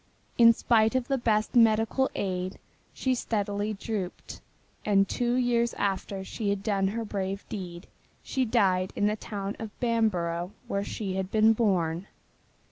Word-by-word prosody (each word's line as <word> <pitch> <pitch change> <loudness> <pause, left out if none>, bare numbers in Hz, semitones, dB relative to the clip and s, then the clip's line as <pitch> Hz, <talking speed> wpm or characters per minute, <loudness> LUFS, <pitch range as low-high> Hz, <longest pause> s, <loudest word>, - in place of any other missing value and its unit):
In 230 -1 +9
spite 225 0 +2
of 255 -1 0
the 270 - +2
best 215 -2 +1
medical 225 +3 +4
aid 185 -1 -2 0.3
she 260 - 0
steadily 205 -3 -1
drooped, 195 -3 -5 0.4
and 195 -1 +3
two 240 +3 0
years 240 -2 +1
after 195 0 -2
she 205 +2 -3
had 200 -1 -1
done 195 -3 +1
her 225 +3 -3
brave 195 -1 -4
deed 180 -4 -6 0.4
she 265 - -1
died 190 -6 +2
in 205 - +1
the 210 +1 +2
town 205 -2 -5
of 220 -2 -8
Bamborough 185 -7 0
where 200 0 -1
she 195 -2 -4
had 190 -1 -2
been 220 +1 +5
born. 185 -5 0
210 Hz, 150 wpm, -28 LUFS, 190-230 Hz, 0.4 s, In